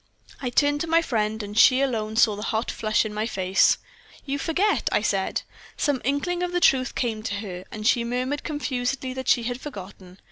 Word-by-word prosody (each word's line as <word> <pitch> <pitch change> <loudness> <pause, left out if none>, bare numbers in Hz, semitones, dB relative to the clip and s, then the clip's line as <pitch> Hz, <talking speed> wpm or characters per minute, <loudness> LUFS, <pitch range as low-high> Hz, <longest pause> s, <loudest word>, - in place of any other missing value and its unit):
"I 255 - -1
turned 290 +3 +2
to 335 - -2
my 330 +1 +3
friend, 220 -5 -1
and 205 0 -7
she 255 +4 +6
alone 220 -5 -1
saw 220 -2 +4
the 205 - -7
hot 225 +2 -1
flush 215 0 0
on 215 - -5
my 215 +1 -2
face. 190 -3 +3 0.5
"'You 280 0 -2
forget,' 365 +8 +1
I - - +1
said. - - 0 0.3
"Some 285 -4 0
inkling 285 +8 -1
of 360 0 -1
the 355 - +2
truth 260 -6 +3
came 225 -3 -1
to 210 -2 -3
her, 190 -3 -6
and 215 -1 -6
she 240 0 +3
murmured 255 +4 -2
confusedly 265 -3 -2
that 260 -1 -6
she 235 - +3
had 245 +2 -4
forgotten. 190 -7 -10
245 Hz, 205 wpm, -25 LUFS, 215-285 Hz, 0.5 s, she